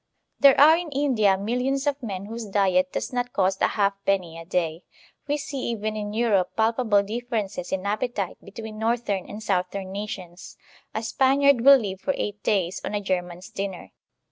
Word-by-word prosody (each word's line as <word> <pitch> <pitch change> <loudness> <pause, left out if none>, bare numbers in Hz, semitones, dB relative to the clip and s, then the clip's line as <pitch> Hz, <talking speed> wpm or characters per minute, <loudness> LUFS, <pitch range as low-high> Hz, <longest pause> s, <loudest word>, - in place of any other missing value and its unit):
There 275 -1 +7
are 305 +3 +8
in 340 -1 -3
India 245 -9 +2
millions 250 +7 -1
of 285 -1 -1
men 200 -5 -5
whose 225 +1 -6
diet 185 -2 +2
does - - -4
not 245 0 -2
cost 190 0 +1
a - - +5
half 200 -1 +1
penny 185 -4 0
a 165 - -10
day. 170 -2 -1 0.4
We 290 +1 0
see 285 -1 -5
even 215 -2 -2
in 205 -1 -4
Europe 215 -4 +1
palpa 225 +2 +1
ble 205 -1 +5
differences 215 -4 -4
in 190 0 -2
appetite 205 -2 -2
between 215 +2 -8
northern 220 -4 -1
and 215 +1 -7
south 185 -2 -1
em 190 -1 -5
nations. 190 -3 -7 0.4
A 220 - -2
Spaniard 270 +2 +3
will 275 +2 +9
live 195 -5 -5
for 280 +5 -1
eight 210 0 -4
days 190 -4 0
on 210 - -3
a - - +1
German's 180 -2 -3
dinner. 190 - -5
210 Hz, 185 wpm, -25 LUFS, 190-245 Hz, 0.4 s, will